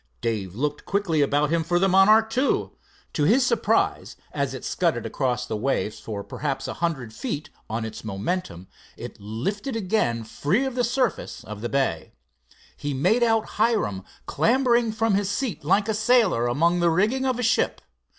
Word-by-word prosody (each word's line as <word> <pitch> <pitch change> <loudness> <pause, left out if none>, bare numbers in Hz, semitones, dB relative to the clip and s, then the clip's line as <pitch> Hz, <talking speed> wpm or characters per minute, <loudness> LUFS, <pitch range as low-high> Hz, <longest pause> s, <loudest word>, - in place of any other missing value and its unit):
Dave 100 -5 -3
looked 145 +4 -2
quickly 195 -6 0
about 145 +1 +2
him 165 -1 +2
for 175 +2 +1
the 190 +2 +3
Monarch 215 +4 +5
II. 260 +3 +1 0.4
To 150 - 0
his 245 - +4
surprise, - - +1 0.2
as - - -2
it - - -7
scudded - - 0
across 125 -3 -1
the 110 - -4
waves 110 -2 -1
for 105 -2 -6
perhaps 140 +3 -4
a - - -3
hundred 140 -10 -3
feet 150 - -5 0.2
on 110 +1 -2
its 110 0 -7
momentum, 100 - -3 0.3
it - - -9
lifted 195 - -3
again 185 - 0
free 165 - 0
of 265 - -3
the 250 0 0
surface 250 0 -1
of 105 -1 -8
the 120 - -3
bay. 135 -12 -1 0.6
He 145 -1 -4
made 185 - +2
out 225 -2 +3
Hiram 210 - +1 0.2
clambering 240 -2 +2
from 225 -1 0
his 195 0 +1
seat 205 - -3
like 200 +7 +2
a 220 - +1
sailor 215 - +3
among 170 +8 +2
the 175 0 +3
riggings 220 +11 +1
of 255 -2 0
a 250 - -2
ship. 245 +3 +1
175 Hz, 175 wpm, -24 LUFS, -, 0.6 s, Monarch